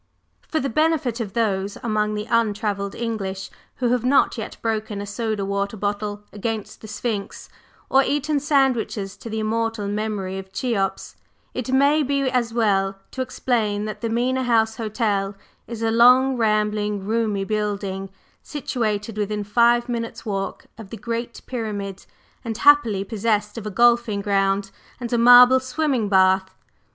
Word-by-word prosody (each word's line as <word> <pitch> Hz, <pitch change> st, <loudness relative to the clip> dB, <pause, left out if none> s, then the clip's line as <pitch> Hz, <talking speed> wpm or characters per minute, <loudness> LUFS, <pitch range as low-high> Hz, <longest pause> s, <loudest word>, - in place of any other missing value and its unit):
/For/ 315 Hz, -, +1 dB
the 275 Hz, -, -1 dB
benefit 275 Hz, -3 st, +1 dB
of 210 Hz, -4 st, -4 dB
those 200 Hz, -3 st, -1 dB
among 215 Hz, -2 st, 0 dB
the 210 Hz, 0 st, -3 dB
untravelled 210 Hz, -3 st, 0 dB
English 195 Hz, -5 st, -4 dB, 0.2 s
who 245 Hz, -2 st, 0 dB
have 245 Hz, -1 st, +1 dB
not 265 Hz, +3 st, +3 dB
yet 220 Hz, -3 st, -6 dB
broken 220 Hz, -2 st, -2 dB
a 205 Hz, -, -4 dB
soda 210 Hz, -1 st, -2 dB
water 200 Hz, +2 st, -2 dB
bottle 205 Hz, +1 st, -3 dB
against 215 Hz, 0 st, -4 dB
the 220 Hz, -, -9 dB
Sphinx, 210 Hz, -1 st, -4 dB, 0.4 s
or 270 Hz, -, +5 dB
eaten 295 Hz, +2 st, 0 dB
sandwiches 265 Hz, -8 st, 0 dB
to 230 Hz, -, -9 dB
the 220 Hz, 0 st, -3 dB
immortal 225 Hz, -1 st, -1 dB
memory 205 Hz, -2 st, -3 dB
of 190 Hz, 0 st, -10 dB
Cheops, 195 Hz, -4 st, -2 dB, 0.4 s
it 255 Hz, 0 st, -4 dB
may 280 Hz, +3 st, +4 dB
be 280 Hz, 0 st, 0 dB
as 250 Hz, -3 st, 0 dB
well 195 Hz, -4 st, +1 dB
to 260 Hz, -, -4 dB
explain 225 Hz, -5 st, -1 dB
that 215 Hz, -, -6 dB
the 230 Hz, -, -1 dB
Mena 250 Hz, +3 st, 0 dB
House 225 Hz, -2 st, +2 dB
Hotel 210 Hz, -3 st, -1 dB, 0.3 s
is 230 Hz, -1 st, -6 dB
a 225 Hz, -, +2 dB
long, 250 Hz, +3 st, +6 dB
rambling, 210 Hz, -3 st, 0 dB
roomy 215 Hz, -2 st, 0 dB
building, 200 Hz, -2 st, -3 dB, 0.3 s
situated 225 Hz, -6 st, -3 dB
within 210 Hz, 0 st, -2 dB
five 235 Hz, +3 st, +3 dB
minutes' 230 Hz, -1 st, -4 dB
walk 195 Hz, -2 st, -3 dB
of 215 Hz, -3 st, -10 dB
the 225 Hz, -, -7 dB
Great 235 Hz, +2 st, -4 dB
Pyramid, 205 Hz, -5 st, -5 dB, 0.4 s
and 225 Hz, -3 st, -4 dB
happily 240 Hz, -9 st, +4 dB
possessed 210 Hz, -1 st, -1 dB
of 220 Hz, -2 st, -6 dB
a -, -, -2 dB
golfing 235 Hz, -1 st, +3 dB
ground 195 Hz, -1 st, +1 dB, 0.3 s
and 245 Hz, -1 st, -4 dB
a -, -, +3 dB
marble 245 Hz, +2 st, +8 dB
swimming 260 Hz, -4 st, -1 dB
bath. 190 Hz, -1 st, +3 dB
220 Hz, 155 wpm, -22 LUFS, 205-240 Hz, 0.4 s, marble